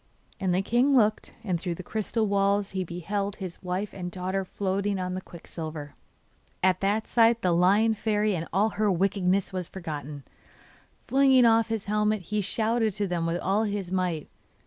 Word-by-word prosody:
And 190 -2 0
the 185 +2 +1
king 255 +6 +3
looked, 215 -2 +1
and 185 -5 -1
through 175 -2 -2
the 185 - -8
crystal 220 +3 -1
walls 200 0 +1
he 190 -1 -2
beheld 195 +4 -3
his 185 -4 -7
wife 185 +2 -3
and 180 -2 -5
daughter 185 +2 -2
floating 195 +1 -2
on 180 0 -3
the 185 - -4
quicksilver. 160 -4 -8 0.7
At 185 0 +3
that 205 +3 0
sight 230 0 +3
the 180 - +3
Lion 195 +6 +4
Fairy 210 -1 0
and 165 -1 -4
all 200 +5 +2
her 210 0 +1
wickedness 190 +1 +1
was 180 -2 -3
forgotten. 150 -5 -6 0.8
Flinging 265 -2 +5
off 225 -1 +4
his 225 -3 -3
helmet, 210 -1 +1
he 210 +4 -1
shouted 220 +2 0
to 205 +1 -1
them 175 -3 -1
with 165 +1 0
all 205 +4 +1
his 200 -3 -3
might. 180 -5 -1
195 Hz, 175 wpm, -27 LUFS, 180-215 Hz, 0.8 s, Flinging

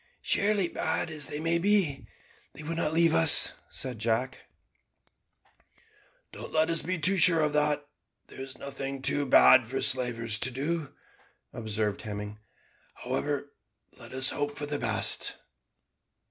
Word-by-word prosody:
"Surely, 200 -2 0
bad 165 - -2
as 150 -3 -4
they 150 - -6
may 165 +1 -1
be, 190 -7 0 0.5
they 155 - -11
would 165 +2 -6
not 155 - -2
leave 165 0 +2
us," 165 -2 +8 0.2
said 125 -4 -6
Jack. 115 +3 -3 1.8
"Don't - - -11
let 160 +1 0
us 165 - +1
be 185 +4 -4
too 185 +5 +2
sure 165 -2 +6
of 150 -1 -1
that. 150 -1 0 0.4
There - - -12
is 135 -1 -9
nothing 135 -1 -8
too 145 0 0
bad 130 -1 +5
for 135 +3 -5
slavers 115 -3 0
to 130 - +2
do," 145 +4 -5 0.6
observed 110 -2 -4
Hemming; 105 0 -8 0.6
"however, 145 -1 -4 0.4
let - - -12
us 130 +2 +2
hope 145 0 -5
for 145 - -5
the 145 0 -5
best." - - 0
145 Hz, 145 wpm, -26 LUFS, 130-160 Hz, 1.8 s, us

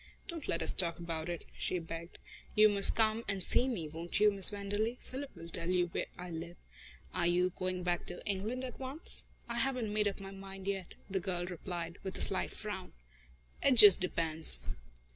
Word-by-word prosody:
"Don't 335 -6 -7
let - - -1
us - - +6
talk 170 -3 0
about 165 -1 -5
it," 170 -1 -6
she 185 - -1
begged. 165 0 -8 0.4
"You 215 0 +6
must 200 -1 +2
come 220 0 +2
and 195 -2 -2
see 250 - +3
me, 195 -12 -3
won't 165 +4 -3
you, 210 0 +5
Miss 195 -2 +9
Wenderley? 205 +4 -3
Philip 270 +2 -8
will 165 - -10
tell 170 +1 -4
you 180 -1 +1
where - - -4
I 180 0 -8
live. 170 +1 -7 0.6
Are 175 - 0
you 180 +1 +1
going 185 -1 -3
back 175 -1 -2
to 175 - -5
England 210 +6 -3
at 250 -3 -8
once?" 270 +5 +2 0.2
"I 235 0 -4
haven't 250 -5 -2
made 210 -1 +1
up 200 - -4
my 195 0 -9
mind 195 0 -10
yet," 195 -2 -4
the 190 -1 -2
girl 175 -1 -3
replied, 175 -1 -6
with 190 -1 -6
a - - -3
slight - - +2
frown. - - -8 0.7
"It 275 - +5
just 205 -6 +10
depends." 160 - +2
190 Hz, 200 wpm, -32 LUFS, 175-215 Hz, 0.7 s, just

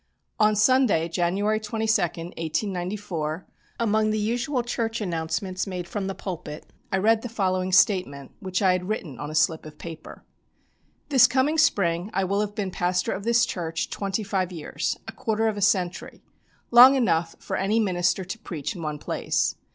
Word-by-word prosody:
On 215 0 +4
Sunday, 215 -6 +3
January 190 +5 0
22, 220 0 0
1894, 175 0 -3 0.3
among 215 -1 +2
the 215 - 0
usual 240 +4 -1
church 230 -1 -2
announcements 180 +1 -2
made 180 -2 -5
from 200 0 -3
the 195 - -4
pulpit, 165 -5 -7 0.3
I 190 - +2
read 220 +3 +3
the 245 - -6
following 185 -4 -1
statement, 180 -8 +2
which 185 0 -2
I 190 - +5
had 180 +1 -2
written 160 - -4
on 145 +1 -5
a 155 - -6
slip 160 +1 +2
of 155 -1 -11
paper: 165 -1 -10 0.9
"This 265 -5 +7
coming 270 +5 +1
spring 185 - +2
I 195 - +2
will 200 +2 0
have 205 -1 -3
been 195 -3 -2
pastor 180 0 0
of 195 - -4
this 235 0 +4
church 165 -3 -3
twenty 200 +1 -2
five 190 -2 -1
years 165 -4 -3
a - - -5
quarter 225 -1 -1
of 220 - 0
a 205 - -5
century 185 -2 0 0.5
long 250 +3 +9
enough 170 -10 +1
for - - -5
any 205 +4 +1
minister 185 -2 +1
to 225 +6 -6
preach 165 - -5
in 175 - -7
one 150 -2 -3
place. - - -1
190 Hz, 175 wpm, -25 LUFS, 175-215 Hz, 0.9 s, long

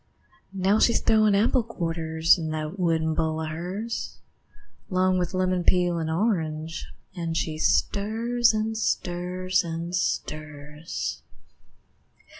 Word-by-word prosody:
Now 195 +3 +3
she's 235 - +4
throwin' 215 -2 +4
apple 230 +5 +3
quarters 165 -6 +1
In 160 -3 -4
that 155 +4 -4
wooden 160 -2 +1
bowl 160 -1 -1
of 160 - -3
hers, 190 +8 -4 0.7
'Long 185 -1 +2
with 180 +1 -2
lemon 185 -1 +1
peel 175 -1 +2
and 160 -1 -2
orange, 160 -4 -1 0.3
An' 165 -2 -3
she 155 -1 -2
stirs, 220 +7 +2
an' 220 0 -1
stirs, 185 -3 -1
an' 170 +1 -5
stirs. 150 -3 -3
175 Hz, 115 wpm, -26 LUFS, 160-200 Hz, 0.7 s, she's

